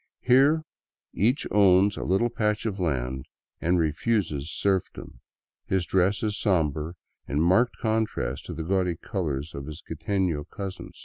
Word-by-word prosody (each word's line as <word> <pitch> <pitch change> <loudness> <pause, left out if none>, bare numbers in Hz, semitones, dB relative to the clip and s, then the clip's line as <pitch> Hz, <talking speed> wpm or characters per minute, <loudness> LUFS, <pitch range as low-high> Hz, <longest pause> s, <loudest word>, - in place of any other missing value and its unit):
Here 140 +5 +4 0.5
'each 120 - +1
owns 100 0 +5
a - - -5
little 95 +6 +2
patch 105 -3 0
of 105 -3 -2
land 65 -6 -2 0.3
and 90 +2 +2
refuses 80 - 0
serfdom. 95 -11 -2 0.5
His 95 -2 +1
dfessi§" 100 +4 +1
somber, 80 -5 0 0.3
in 70 - -1
marked 95 +9 +3
contrast 110 - -1
to 85 - -5
the 80 - -4
gaudy 90 0 0
colors 80 - -3
of 70 0 -7
his 75 +2 -8
quiteTio 80 -2 -1
cousin. 95 -2 -6
90 Hz, 135 wpm, -26 LUFS, 80-105 Hz, 0.5 s, owns